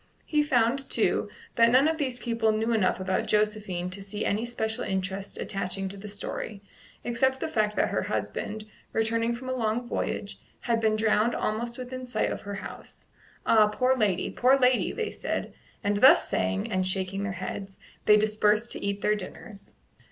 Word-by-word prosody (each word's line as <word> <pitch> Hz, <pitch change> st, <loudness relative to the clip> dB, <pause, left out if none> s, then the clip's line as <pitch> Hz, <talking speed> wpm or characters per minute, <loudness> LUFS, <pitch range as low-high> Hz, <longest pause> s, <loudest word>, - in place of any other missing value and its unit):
He 300 Hz, -1 st, +2 dB
found, 265 Hz, -1 st, +1 dB
too, -, -, +1 dB, 0.3 s
that 230 Hz, 0 st, +6 dB
none 260 Hz, +5 st, +5 dB
of 320 Hz, 0 st, 0 dB
these 260 Hz, -4 st, -1 dB
people 230 Hz, -2 st, +1 dB
knew 220 Hz, +2 st, 0 dB
enough 190 Hz, -4 st, +2 dB
about 185 Hz, 0 st, -1 dB
Josephine 210 Hz, -4 st, 0 dB
to 200 Hz, +2 st, -6 dB
see 200 Hz, +2 st, -4 dB
any 215 Hz, +3 st, 0 dB
special 225 Hz, -2 st, -2 dB
interest 190 Hz, +1 st, -3 dB
attaching 195 Hz, -1 st, -2 dB
to 195 Hz, -, -7 dB
the 200 Hz, +1 st, -9 dB
story, 205 Hz, 0 st, -6 dB, 0.4 s
except 265 Hz, +3 st, +1 dB
the -, -, -2 dB
fact 215 Hz, -8 st, 0 dB
that -, -, +2 dB
her -, -, 0 dB
husband, 215 Hz, 0 st, -3 dB, 0.3 s
returning 230 Hz, +1 st, +1 dB
from 255 Hz, +2 st, -8 dB
a 255 Hz, -, -1 dB
long 235 Hz, 0 st, -1 dB
voyage, -, -, -3 dB, 0.2 s
had 230 Hz, -2 st, 0 dB
been 220 Hz, -1 st, +3 dB
drowned 220 Hz, +1 st, +2 dB
almost 235 Hz, +3 st, -2 dB
within 255 Hz, 0 st, -6 dB
sight 245 Hz, -, 0 dB
of -, -, -4 dB
her 205 Hz, -1 st, -6 dB
house. 195 Hz, -, -9 dB, 0.4 s
"Ah, 215 Hz, -2 st, +6 dB
poor 255 Hz, +5 st, +2 dB
lady! 210 Hz, -7 st, +1 dB
poor 260 Hz, +2 st, +4 dB
lady!" 255 Hz, -1 st, +3 dB
they 450 Hz, -2 st, -3 dB
said; -, -, -4 dB, 0.3 s
and 205 Hz, 0 st, +1 dB
thus 260 Hz, +6 st, +7 dB
saying, 95 Hz, +1 st, -1 dB
and 185 Hz, 0 st, +1 dB
shaking 190 Hz, +1 st, -2 dB
their 200 Hz, -2 st, -2 dB
heads, 195 Hz, +2 st, -6 dB, 0.3 s
they 210 Hz, -, +8 dB
dispersed 215 Hz, +1 st, +2 dB
to -, -, -5 dB
eat 200 Hz, 0 st, -2 dB
their 210 Hz, -, +3 dB
dinners. 200 Hz, 0 st, -8 dB
215 Hz, 180 wpm, -27 LUFS, 200-240 Hz, 0.4 s, they